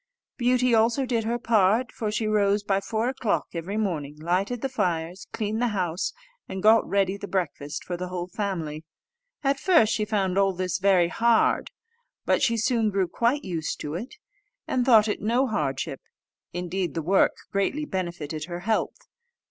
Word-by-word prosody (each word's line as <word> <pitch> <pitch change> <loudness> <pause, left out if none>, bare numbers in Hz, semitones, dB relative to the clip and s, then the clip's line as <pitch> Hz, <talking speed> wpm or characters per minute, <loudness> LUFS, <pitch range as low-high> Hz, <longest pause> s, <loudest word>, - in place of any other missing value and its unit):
Beauty 250 0 +2
also 230 +4 +3
did 235 -3 -1
her 235 +2 0
part, 225 +1 +2
for 215 -4 -3
she 215 +1 -1
rose 205 -1 +2
by 195 -1 +1
four 220 +3 -1
o'clock 250 -4 -1
every 175 +5 -4
morning, 155 -9 -2
lighted 185 +9 -1
the - - +2
fires, 175 -7 -2
cleaned 220 +1 -2
the 245 - +3
house, 175 -1 -1 0.4
and 190 - -5
got 220 +1 +6
ready 195 -1 +1
the 200 - -7
breakfast 155 -6 -3
for 180 - -4
the 180 +1 -4
whole 180 -1 -4
family. 170 -6 -4 0.6
At 275 0 +1
first 325 - +4
she 215 - 0
found 195 -3 0
all 195 -1 +3
this 185 0 -2
very 185 -3 +4
hard; 230 +3 +2 0.6
but - - +2
she 230 -1 +2
soon 225 -1 +2
grew 195 -2 0
quite 240 - 0
used 165 -4 -3
to 150 - -4
it, 225 - -6 0.5
and 250 0 0
thought 220 -4 +7
it 210 - -2
no 235 +5 +2
hardship; 140 - -2 0.5
indeed, 180 -2 -3
the 165 - -2
work 190 +4 +3 0.2
greatly 265 +10 0
benefited 170 - -4
her 175 0 -6
health. 220 +3 0
200 Hz, 170 wpm, -26 LUFS, 175-230 Hz, 0.6 s, thought